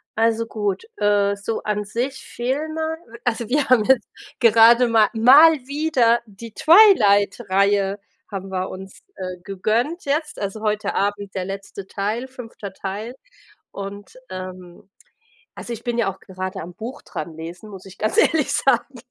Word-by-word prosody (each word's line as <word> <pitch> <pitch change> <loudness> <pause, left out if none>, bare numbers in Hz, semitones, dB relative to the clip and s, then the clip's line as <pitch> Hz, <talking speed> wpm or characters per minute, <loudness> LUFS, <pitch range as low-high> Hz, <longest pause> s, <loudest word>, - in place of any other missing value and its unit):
Also, 225 +1 +1
gut, 205 - -3
äh, 205 - +2
so 210 +3 -4
an 210 -1 -1
sich, 250 +6 -4
Filme 315 +6 -3 0.3
also 235 -1 -1
wir 285 +1 +1
haben 250 -4 +5
jetzt 250 0 +3 0.3
gerade 230 +2 +6
ma 225 -2 +4
mal 270 +8 +8 0.2
wieder 275 -6 +2
die 220 +1 -12
Twilight 240 - +5
Reihe 200 +1 +2 0.3
haben 195 -1 -6
wir 185 0 -3
uns, 190 0 -10
äh, 185 -1 -6
gegönnt 225 - -1
jetzt, 295 +2 -2
also, 200 +1 -4
heute 210 -1 -1
Abend 200 -1 -2
der 185 - -2
letzte 195 0 -7
Teil, 215 +6 -3
5. 230 -6 -9
Teil. 205 +6 -6 0.6
Und, 200 +4 -8
ähm 185 -1 -9 0.7
also, 240 - -6
ich 230 - -9
bin 240 -1 -2
ja 225 -5 +1
auch 190 - -17
gerade 185 0 -6
am 175 +2 -9
Buch 245 +6 -7
dran 170 - -6
lesen, 170 +6 -9
muss 190 -1 -11
ich 190 -1 -13
ganz 215 - -1
ehrlich 320 - +3
sagen, 270 0 +1
215 Hz, 155 wpm, -21 LUFS, 195-245 Hz, 0.7 s, mal